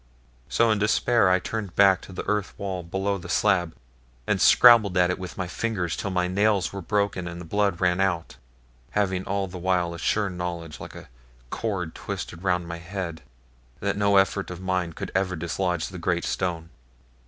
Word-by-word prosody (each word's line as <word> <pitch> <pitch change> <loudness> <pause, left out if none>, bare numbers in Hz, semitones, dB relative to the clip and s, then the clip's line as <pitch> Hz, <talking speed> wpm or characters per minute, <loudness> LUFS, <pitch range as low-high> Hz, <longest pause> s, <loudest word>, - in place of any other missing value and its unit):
So 115 -1 +3
in 105 - +1
despair 110 0 +3
I 90 - +5
turned 100 -1 -5
back 100 -2 +5
to - - -12
the 90 - -6
earth 105 -1 -1
wall 95 -3 -3
below 95 +3 -2
the - - -10
slab, 90 -6 +2 0.5
and - - 0
scrabbled 110 -6 +7
at 90 0 +4
it 90 - -3
with 90 -1 -7
my 95 - -2
fingers, 90 -2 -2
till 100 - -3
my 90 -1 0
nails 100 +1 +1
were 100 - -5
broken 100 -2 -1
and 85 0 -6
the 85 - -8
blood 100 0 0
ran 90 -1 +2
out; 85 -4 -1 0.6
having 95 -3 +1
all 100 0 -1
the 90 -1 -8
while 90 -1 0
a 85 - -8
sure 105 +4 +1
knowledge, 85 -3 -5
like - - -9
a - - -10 0.4
cord 95 -8 -3
twisted 85 - -6
round 90 -2 0
my 85 0 -6
head, 85 -1 -5 0.6
that 100 0 -1
no 100 -1 +3
effort 95 0 +2
of 90 -1 -7
mine 90 -2 -1
could - - -6
ever 95 -1 0
dislodge 90 0 -2
the - - -8
great - - 0
stone. 85 -3 -2
95 Hz, 190 wpm, -25 LUFS, 90-100 Hz, 0.6 s, scrabbled